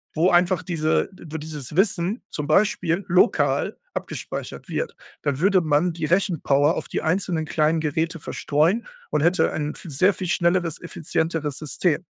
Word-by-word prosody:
wo 170 Hz, +4 st, +3 dB
einfach 175 Hz, 0 st, +3 dB
diese 160 Hz, -3 st, +1 dB, 0.2 s
wo 160 Hz, +1 st, -5 dB
dieses 150 Hz, -2 st, -7 dB
Wissen 190 Hz, +2 st, +1 dB
zum 150 Hz, -1 st, -4 dB
Beispiel 180 Hz, 0 st, +2 dB
lokal 180 Hz, +5 st, +2 dB, 0.2 s
abgespeichert -, -, -6 dB
wird, -, -, -3 dB, 0.3 s
dann 140 Hz, -2 st, -1 dB
würde 190 Hz, +1 st, +4 dB
man 160 Hz, +2 st, +2 dB
die 160 Hz, -2 st, -3 dB
Rechenpower 160 Hz, -5 st, +2 dB
auf -, -, -4 dB
die -, -, -3 dB
einzelnen 165 Hz, -1 st, 0 dB
kleinen 155 Hz, +1 st, +1 dB
Geräte 160 Hz, +2 st, -1 dB
verstreuen 155 Hz, +9 st, 0 dB, 0.2 s
und -, -, +1 dB
hätte 175 Hz, +4 st, +3 dB
ein 150 Hz, -1 st, -3 dB
v 170 Hz, -, -10 dB
sehr 185 Hz, +8 st, +3 dB
viel 185 Hz, -, -4 dB
schnelleres, 175 Hz, -1 st, +1 dB
effizienteres 160 Hz, -3 st, -2 dB
System. 155 Hz, +2 st, 0 dB
165 Hz, 155 wpm, -23 LUFS, 155-180 Hz, 0.3 s, würde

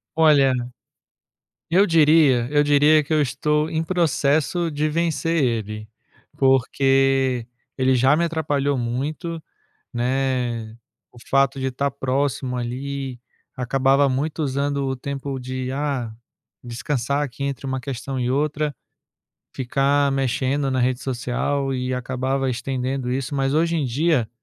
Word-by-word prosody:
Olha, 145 Hz, -5 st, +5 dB, 1.2 s
eu 190 Hz, +4 st, +5 dB
diria 150 Hz, -, +4 dB
eu 145 Hz, 0 st, +4 dB
diria 145 Hz, +1 st, +4 dB
que 155 Hz, -, -3 dB
eu 155 Hz, -, +3 dB
estou 150 Hz, +3 st, 0 dB
em 160 Hz, 0 st, -1 dB
processo 165 Hz, -1 st, +1 dB
de 150 Hz, +1 st, 0 dB
vencer 165 Hz, -1 st, 0 dB
ele, 105 Hz, -3 st, -2 dB, 0.5 s
porque 135 Hz, -1 st, +2 dB, 0.3 s
ele 130 Hz, 0 st, +3 dB
já 130 Hz, +4 st, +4 dB
me 170 Hz, -, +1 dB
atrapalhou 145 Hz, -4 st, 0 dB
muito, 150 Hz, +8 st, -3 dB, 0.5 s
né. 120 Hz, -3 st, -1 dB, 0.4 s
O 120 Hz, -, -16 dB
fato 135 Hz, 0 st, +3 dB
de 130 Hz, -, -1 dB
estar 140 Hz, +2 st, -1 dB
próximo 135 Hz, -1 st, -1 dB
ali, 130 Hz, +1 st, -4 dB, 0.4 s
acabava 135 Hz, +2 st, +2 dB
muito 150 Hz, +4 st, -2 dB
usando 140 Hz, 0 st, -1 dB
o 130 Hz, 0 st, -2 dB
tempo 140 Hz, 0 st, -5 dB
de: 130 Hz, 0 st, -4 dB
"Ah, 135 Hz, -5 st, -2 dB, 0.5 s
descansar 130 Hz, +3 st, -2 dB
aqui 140 Hz, 0 st, -4 dB
entre 140 Hz, 0 st, -4 dB
uma 130 Hz, -1 st, -2 dB
questão 130 Hz, 0 st, -5 dB
e 125 Hz, 0 st, -1 dB
outra", 150 Hz, +1 st, 0 dB, 0.8 s
ficar 140 Hz, +2 st, +1 dB
mexendo 135 Hz, +1 st, 0 dB
na 130 Hz, -1 st, 0 dB
rede 125 Hz, +1 st, 0 dB
social 135 Hz, +2 st, -2 dB
e 125 Hz, 0 st, -2 dB
acabava 130 Hz, +1 st, -1 dB
estendendo 130 Hz, +1 st, -2 dB
isso. 135 Hz, +2 st, -3 dB
Mas 135 Hz, 0 st, 0 dB
hoje 165 Hz, +2 st, +2 dB
em 150 Hz, -4 st, 0 dB
dia, 130 Hz, -2 st, +1 dB
135 Hz, 130 wpm, -22 LUFS, 130-145 Hz, 1.2 s, Olha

